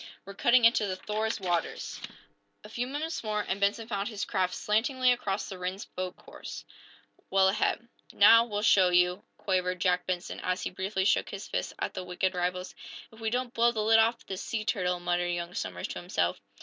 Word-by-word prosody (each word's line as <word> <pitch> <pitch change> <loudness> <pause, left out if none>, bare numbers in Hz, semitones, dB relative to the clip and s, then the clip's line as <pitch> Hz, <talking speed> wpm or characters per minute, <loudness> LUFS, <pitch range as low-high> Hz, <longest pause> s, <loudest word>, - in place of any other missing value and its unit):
"We're 200 - -8
cutting 240 +4 +4
into 230 -2 +4
the 185 - -2
'Thor's' 215 +3 -2
water." 175 -3 -1 0.9
A 210 - -11
few 240 +3 -3
moments 300 +3 -4
more, 210 -1 -1
and 195 +1 -2
Benson 210 +3 +1
found 200 -3 -2
his 210 -3 -4
craft 180 -1 0
slantingly 250 +4 +2
across 210 -5 -1
the 190 -2 -8
Rhinds 185 +2 -4
boat's 185 0 -6
course, - - -9 0.6
well 190 0 +4
ahead. 230 +4 0 0.2
"Now, 230 +3 +7
we'll 210 -2 -3
show 190 -4 +5
you!" 180 +2 +3
quavered 185 -2 -1
Jack 180 0 +1
Benson, 185 -1 -3
as 185 0 -2
he - - -3
briefly 190 +1 -2
shook - - +2
his 200 0 -7
fist 90 0 -3
back - - -1
at - - -30
the 185 - -5
wicked 180 +1 -1
rivals. 180 +1 -2 0.4
"If 220 - -16
we 225 -1 -1
don't 245 +1 -2
blow 235 0 +4
the 220 -2 -2
lid 225 +1 +5
off 230 +1 +2
this 190 0 -5
sea 220 -2 -3
turtle!" 180 -3 0
muttered 175 0 0
young 175 0 -3
Somers, 90 - -4
to - - -5
himself. 100 - -1
195 Hz, 200 wpm, -29 LUFS, 180-220 Hz, 0.9 s, Now